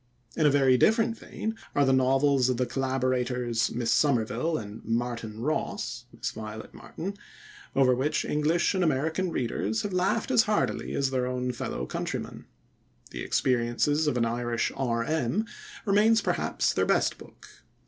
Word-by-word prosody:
In 155 - +3
a - - +6
very 135 -2 +4
different 225 - +3
vein 220 0 -5 0.2
are 145 - +4
the 135 - +3
novels 135 0 +3
of 125 - 0
the 125 - +1
collaborators, 125 -3 0
Miss 115 -1 -1
Somerville 130 +3 +1
and 105 0 -8
"Martin 115 -2 -3
Ross" 155 +5 -2
(Miss - - -4
Violet 110 0 -8
Martin), 195 +4 -7 0.6
over 130 -2 +5
which 135 +5 0
English 155 +5 +1
and 185 -2 +1
American 160 +4 0
readers 110 - -1
have 200 - -3
laughed 190 +7 +1
as 240 -3 +6
heartily 210 - 0
as 135 -1 0
their 130 -1 0
own 125 0 -2
fellow 115 - -4
countrymen. - - -5 0.7
_The - - -5
Experiences 130 +5 +1
of 125 - +1
an 115 - +2
Irish 120 0 -1
R.M._remains, 160 - 0
perhaps, - - 0
their - - +1
best - - +1
book. - - -14
130 Hz, 150 wpm, -27 LUFS, 120-160 Hz, 0.7 s, a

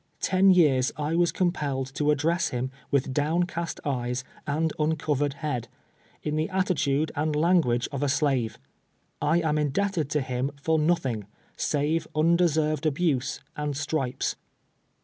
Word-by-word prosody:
Ten 190 +1 +4
years 145 -9 +4
I 150 +1 -1
was 170 0 +3
compelled 140 -7 -1
to 150 +1 0
address 160 +3 +2
liim 125 +1 -3 0.2
witli 135 -1 +1
down 155 +5 +1
cast 170 -2 -4
eyes 125 -2 -1 0.2
and 155 +2 0
uncovered 150 -2 0
bead 125 -6 -2 0.3
— - - -33
in 150 0 -1
the 155 - 0
attitude 160 -6 +1
and 150 +1 0
language 150 -7 +3
of 140 -1 -3
a 145 - +1
slave. 135 -5 +1 0.6
I 165 +3 +3
am 155 -2 +1
indebted 155 +1 0
to 150 0 +1
liim 130 +2 -3
for 160 +2 +1
nothing, 135 - 0 0.3
save 150 +3 0
unde 170 +3 +4
served 155 0 0
abuse 145 -4 0
and 150 -2 -3
stripes. 135 -4 -2
150 Hz, 150 wpm, -26 LUFS, 135-165 Hz, 0.6 s, Ten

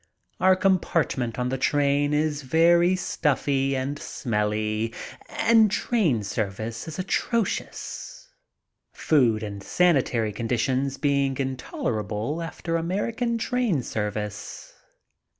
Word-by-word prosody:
Our 185 0 +5
compartment 170 - +1
on 125 0 -1
the 130 0 -2
train 145 +1 +2
is 150 -1 0
very 170 +5 +4
stuffy 140 -5 0
and 135 +3 -3
smelly 110 -1 -2 0.3
and 225 -2 +4
the - - -5
train 170 - +1
service 110 +3 -4
is 160 - -6
atrocious, 235 - -2 0.7
food 120 -8 +2
and 100 -2 -6
sanitary 130 - +2
conditions 130 +5 -1
being 140 -2 +1
intolerable 130 0 -3
after 165 0 -3
American 225 +8 -1
train 230 - 0
service. 105 -1 -5
140 Hz, 100 wpm, -25 LUFS, 115-170 Hz, 0.7 s, Our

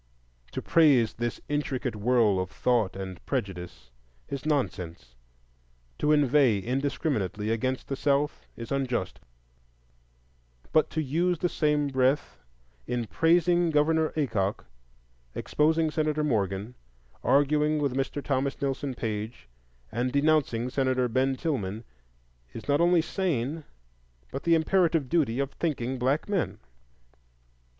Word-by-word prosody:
To - - -4
praise 140 -9 +4
this 120 0 -3
intricate 140 -4 -2
whirl 110 -2 +3
of 90 -1 -2
thought 110 0 +1
and 95 -2 -7
prejudice 95 - -4 0.4
is 140 +1 -4
nonsense; 85 - -2 0.9
to 150 - +2
inveigh 140 -6 +4
indiscriminately 115 - -1
against 130 +3 -1
"the 135 - -2
South" 140 +1 0
is 115 - -8
unjust; 125 -8 -2 1.5
but 155 - +3
to 155 - -2
use 170 +6 +1
the 175 - 0
same 150 -2 +1
breath 135 +1 0 0.5
in 120 -1 -1
praising 175 +5 +3
Governor 160 +1 +2
Aycock, 105 -9 -1 0.7
exposing 160 +1 +1
Senator 155 -1 0
Morgan, 105 -4 -1 0.5
arguing 150 +2 +3
with 140 -3 0
Mr. 135 +1 -2
Thomas 135 0 -1
Nelson 135 -1 -2
Page, 110 - -5 0.4
and 125 +2 -1
denouncing 140 -4 +1
Senator 130 -2 +1
Ben 130 +3 +1
Tillman, 115 - -3 0.7
is - - -8
not 145 +2 +3
only 175 -1 +4
sane, 155 - -2 0.7
but 135 - -6
the 170 0 +5
imperative 165 -3 +2
duty 140 -8 +1
of 140 0 -1
thinking 130 -6 -2
black 135 +5 0
men. 200 -5 -1
135 Hz, 120 wpm, -27 LUFS, 115-150 Hz, 1.5 s, the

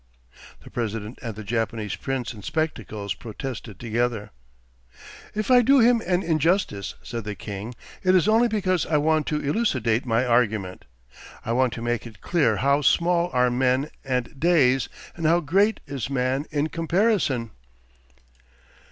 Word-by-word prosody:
The - - -13
president 115 0 -4
and 115 -4 -5
the 110 - -7
Japanese 110 -1 -2
prince 130 0 -3
in 105 - -11
spectacles 110 - -3
protested 115 -3 -7
together. 120 -2 -2 1.0
'If 215 +4 -1
I 250 -1 +8
do 275 +4 +5
him 235 0 +5
an 180 0 +1
injustice,' 160 - 0
said 115 -1 -5
the 105 0 -5
king, 105 +4 -7 0.3
'it 185 0 +3
is 185 +1 +4
only 225 +3 +4
because 185 -6 0
I 155 - +2
want 155 0 +1
to 150 - 0
elucidate 130 - 0
my 115 +2 +2
argument. 110 -6 0 0.6
I - - -2
want 125 +1 +2
to 115 - -6
make 120 0 -2
it 110 -3 -14
clear 170 -4 +2
how 140 +2 +2
small 170 +5 +2
are 125 -1 +2
men 130 +3 +1
and 130 0 -3
days, 135 -7 +3 0.3
and 165 -2 -1
how 170 +2 +4
great 195 +7 +2
is 140 -4 -4
man 135 +2 -1
in 150 +1 -1
comparison.... 165 - +1
130 Hz, 150 wpm, -24 LUFS, 115-170 Hz, 1.0 s, I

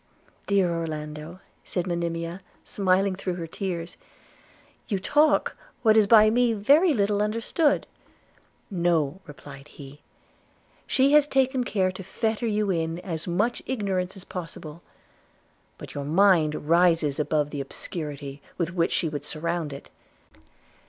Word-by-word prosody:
'Dear 195 -4 +2
Orlando,' 155 +1 -5 0.2
said 180 -2 -3
Monimia 170 0 -3 0.2
smiling 190 0 +1
through 185 -1 -3
her 170 -2 -5
tears, 170 0 -5 0.9
"you 205 - 0
talk 295 +10 +2 0.3
what 220 -2 +5
is 215 -2 +5
by 215 0 +7
me 240 0 +3
very 285 - +4
little 205 -5 +1
understood.' 230 - +1 0.9
'No!' 170 -2 0
replied 145 -1 -12
he, 145 -1 -13 0.9
'she 275 +1 +3
has 300 -1 +6
taken 265 -2 +1
care 190 -5 0
to 185 - -9
fetter 220 +4 -2
you 210 -2 0
in 165 -1 -1
as 165 -3 -5
much 210 +8 0
ignorance 195 -6 -2
as 190 - -11
possible; 165 -3 -8 1.0
but - - -10
your 140 - -4
mind 160 -3 +3
rises 165 -4 +3
above 150 -1 0
the 145 - -3
obscurity 140 -1 -7 0.2
with 170 -1 -2
which 170 -2 +1
she 165 - 0
would 145 -2 -5
surround 160 +1 -3
it. 140 - -10
180 Hz, 130 wpm, -25 LUFS, 160-210 Hz, 1.0 s, by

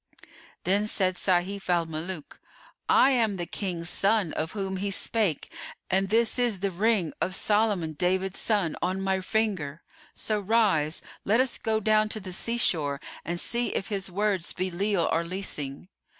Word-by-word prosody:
'" - - -22
Then 200 +4 +2
said 185 -3 +1
Sayf 185 +2 0
al 175 -2 +3
Muluk, 160 0 -5 0.5
"I 270 - +6
am 225 -6 +2
the 175 - -3
King's 175 -3 -3
son 200 -4 +2
of 160 +1 -3
whom 195 -2 -3
he 200 +2 -2
spake, 200 -4 0 0.4
and 190 +1 +2
this 230 +3 +2
is 235 -7 +1
the 195 -1 0
ring 200 -2 +1
of 185 - 0
Solomon 205 -7 +1
David 185 +4 0
son 200 -8 0
on 185 +2 0
my 190 0 0
finger: 185 -8 -1 0.3
so 215 -1 -1
rise, 195 -8 +2 0.2
let 220 +4 +3
us 260 -1 +1
go 220 -1 +1
down 215 0 +3
to 215 - -3
the 185 -2 -8
sea 235 +6 -2
shore 145 -10 +2 0.2
and 170 +1 -3
see 240 +5 -1
if - - -2
his 195 -2 -2
words 195 -2 0
be 185 +1 -2
leal 190 -1 +1
or 165 - +1
leasing!" 170 -5 -4
190 Hz, 170 wpm, -27 LUFS, 175-215 Hz, 0.5 s, I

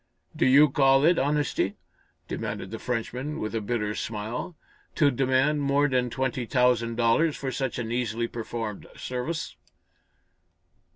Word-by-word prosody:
"Do - - +2
you 140 +4 +7
call 135 0 +4
it 170 +1 +4
honesty," 145 -8 0 0.5
demanded - - -4
the - - -5
Frenchman, 125 +4 -3
with 110 - -3
a 115 - -1
bitter 105 -1 -1
smile, 110 +10 -4 0.4
"to 145 -3 +4
demand 135 +3 +2
more 140 +1 +3
than 125 -2 +1
twenty 130 -1 -2
thousand 125 -3 +2
dollars 120 +7 +2
for 135 -1 -3
such 130 -1 -2
an 115 -2 -3
easily 120 -1 -1
performed 115 -2 -5
service?" 125 - -4
125 Hz, 135 wpm, -26 LUFS, 115-140 Hz, 0.5 s, you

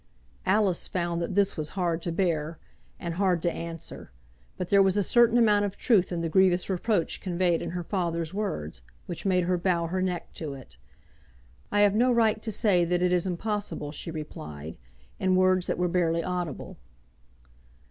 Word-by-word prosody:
Alice 190 -2 +2
found 170 -1 -2
that 170 +2 -3
this 200 -1 +2
was 155 -2 -4
hard 170 -2 0
to 170 - -3
bear 165 -3 -1 0.4
and 170 -3 -4
hard 180 -2 +1
to 175 - +2
answer; 165 -1 -7 0.5
but 180 - -4
there 200 -1 +6
was 195 0 +3
a 205 - +3
certain 240 +2 +4
amount 210 -3 +4
of 200 -1 -3
truth 200 -8 +2
in 170 -1 -2
the 165 - -1
grievous 185 +2 +3
reproach 190 -1 0
conveyed 175 -2 0
in - - -4
her 175 0 -4
father's 170 -3 -2
words, 80 - -4 0.2
which 175 +3 -5
made 180 -1 +3
her 180 0 0
bow 170 -2 +1
her 185 +3 -2
neck 180 -2 -3
to 150 -4 -5
it. 130 - -13 1.0
"I 205 - +3
have 205 -1 +5
no 245 +4 +3
right 225 -2 +2
to 220 - -3
say 195 -4 +2
that 175 +1 0
it 180 - +2
is 180 +1 +2
impossible," 200 -5 -3
she 155 - -6
replied, 80 - -7 0.4
in 185 0 +2
words 185 -1 +3
that - - -1
were 180 +1 +1
barely 170 -1 +1
audible. 180 -4 -4
180 Hz, 185 wpm, -27 LUFS, 170-195 Hz, 1.0 s, there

